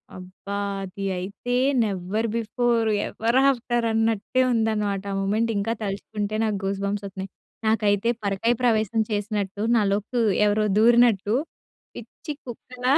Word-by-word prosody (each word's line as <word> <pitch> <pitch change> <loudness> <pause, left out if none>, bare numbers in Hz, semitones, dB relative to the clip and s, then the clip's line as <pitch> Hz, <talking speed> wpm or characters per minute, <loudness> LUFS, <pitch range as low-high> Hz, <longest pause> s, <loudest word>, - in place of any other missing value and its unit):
అబ్బా! 185 +2 -8 0.3
అది 195 +1 -6
అయితే 200 +7 -4 0.3
నెవర్ 200 +2 -2
బిఫోర్, 230 0 +1 0.2
ఎవర్ 230 +3 0
ఆఫ్టర్ 240 -2 0
అన్నట్టే 225 +2 +1
ఉందన్నమాట. 210 -3 0
ఆ 195 - -2
మొమెంట్ 220 +4 +1
ఇంకా 225 +3 0
తలుచుకుంటే 205 +1 -3
నాకు 210 -2 -1
గూస్‌బంప్స్ 200 +1 -2
ఒత్తున్నాయి. 190 0 -7 0.4
నాకైతే 210 0 +2
పరకాయ 200 +4 +1
ప్రవేశం 220 -2 +2
చేసినట్టు 205 -1 -2
నాలోకి 210 +3 +1 0.3
ఎవరో 210 +1 +2
దూరినట్టు 230 -2 +4 0.6
పిచ్చి 240 +7 -8
కుక్కలా 250 +2 -2
215 Hz, 115 wpm, -24 LUFS, 200-230 Hz, 0.6 s, దూరినట్టు